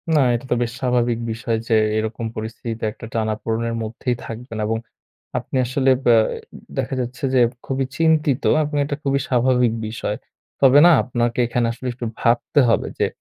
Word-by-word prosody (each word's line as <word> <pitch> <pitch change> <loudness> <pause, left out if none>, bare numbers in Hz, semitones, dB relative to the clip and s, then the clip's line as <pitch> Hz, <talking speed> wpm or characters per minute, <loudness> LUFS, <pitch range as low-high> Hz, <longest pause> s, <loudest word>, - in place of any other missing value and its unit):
না, - - +5 0.2
এটা 120 - -5
তো - - +4
বেশ 120 - -3
স্বাভাবিক 120 -2 +1
বিষয় 115 0 -2
যে 115 - +3 0.2
এইরকম 110 +2 -2
পরিস্থিতিতে 115 +1 -5
একটা 110 - -11
টানাপোড়নের 115 +1 -1
মধ্যেই 115 +3 -2
থাকবেন 115 0 -7
এবং 110 +1 0 0.6
আপনি - - -6
আসলে 130 +2 +2
ব্যা 120 -2 +6 0.6
দেখা - - -1
যাচ্ছে 125 +2 -5
যে 130 - +5 0.3
খুবই 135 0 -1
চিন্তিত 155 -4 +2 0.2
আপনি 150 0 -3
এটা 145 0 -3
খুবই 140 0 +1
স্বাভাবিক 125 -1 +3 0.2
বিষয়। 110 - -3 0.4
তবে 135 +1 +7
না - - +8
আপনাকে 120 -1 -1
এখানে 120 0 0
আসলে 125 +2 -9
একটু 120 0 -6
ভাবতে 120 +4 +2
হবে 115 - +2
যে, - - +3
120 Hz, 165 wpm, -21 LUFS, 115-130 Hz, 0.6 s, না